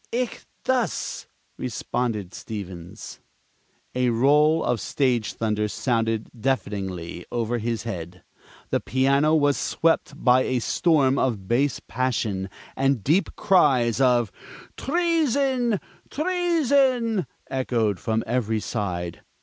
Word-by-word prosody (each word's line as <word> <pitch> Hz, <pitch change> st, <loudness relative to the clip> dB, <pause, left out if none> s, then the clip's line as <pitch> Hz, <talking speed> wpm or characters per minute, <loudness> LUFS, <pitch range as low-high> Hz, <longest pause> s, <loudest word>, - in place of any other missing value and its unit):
"Ichthus!" 250 Hz, 0 st, -2 dB, 0.3 s
responded 115 Hz, -4 st, -2 dB
Stevens. 95 Hz, -6 st, -8 dB, 0.7 s
A 125 Hz, -1 st, +1 dB
roll 150 Hz, +7 st, +4 dB
of 120 Hz, -3 st, 0 dB
stage 125 Hz, -6 st, 0 dB
thunder 105 Hz, -1 st, -1 dB
sounded 115 Hz, -1 st, -1 dB
deafeningly 95 Hz, -9 st, -3 dB
over 120 Hz, 0 st, -1 dB
his 115 Hz, 0 st, -2 dB
head. 90 Hz, -5 st, -6 dB, 0.5 s
The -, -, +2 dB
piano 140 Hz, +4 st, +2 dB
was 145 Hz, -2 st, +3 dB
swept 165 Hz, -2 st, +1 dB
by 125 Hz, 0 st, +4 dB
a 130 Hz, 0 st, 0 dB
storm 140 Hz, +1 st, +2 dB
of 105 Hz, -7 st, -1 dB
bass 130 Hz, +5 st, +1 dB
passion; 110 Hz, -6 st, -1 dB, 0.3 s
and 135 Hz, -5 st, +1 dB
deep 170 Hz, +8 st, +1 dB
cries 130 Hz, -, +3 dB
of 120 Hz, -5 st, +3 dB, 0.4 s
"Treason! 275 Hz, -, +1 dB, 0.3 s
Treason!" 280 Hz, -, +1 dB, 0.2 s
echoed 115 Hz, -6 st, 0 dB
from 110 Hz, 0 st, -1 dB
every 115 Hz, -2 st, 0 dB
side. 90 Hz, -7 st, -3 dB
125 Hz, 100 wpm, -24 LUFS, 110-160 Hz, 0.7 s, roll